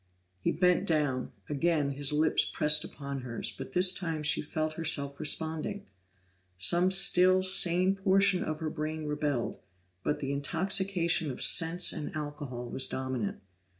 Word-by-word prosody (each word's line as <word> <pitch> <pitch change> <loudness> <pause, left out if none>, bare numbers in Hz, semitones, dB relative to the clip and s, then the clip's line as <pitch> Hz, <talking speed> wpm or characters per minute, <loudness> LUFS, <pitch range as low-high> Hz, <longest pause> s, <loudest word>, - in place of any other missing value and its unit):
He - - -1
bent 180 +2 +1
down; 145 -6 -1 0.2
again 150 -1 0
his 140 0 -3
lips 155 +1 +1
pressed 150 0 +1
upon 140 -2 -7
hers, 120 -3 -6
but 130 0 -9
this 180 +1 +4
time 165 -5 -4
she 150 - +2
felt 155 +1 -4
herself 145 -3 +1
responding. 160 +6 -2 0.7
Some 175 - +3
still 185 0 +4
sane 185 0 +4
portion 195 -1 +2
of 155 0 -5
her 155 -1 -3
brain 155 0 -5
rebelled, 150 -5 -3 0.4
but 150 - -2
the 140 -1 -4
intoxication 170 +2 0
of 130 - -7
sense 170 +2 +4
and 150 - -6
alcohol 145 -5 -6
was 130 0 +3
dominant. 130 -5 -4
155 Hz, 145 wpm, -29 LUFS, 140-180 Hz, 0.7 s, this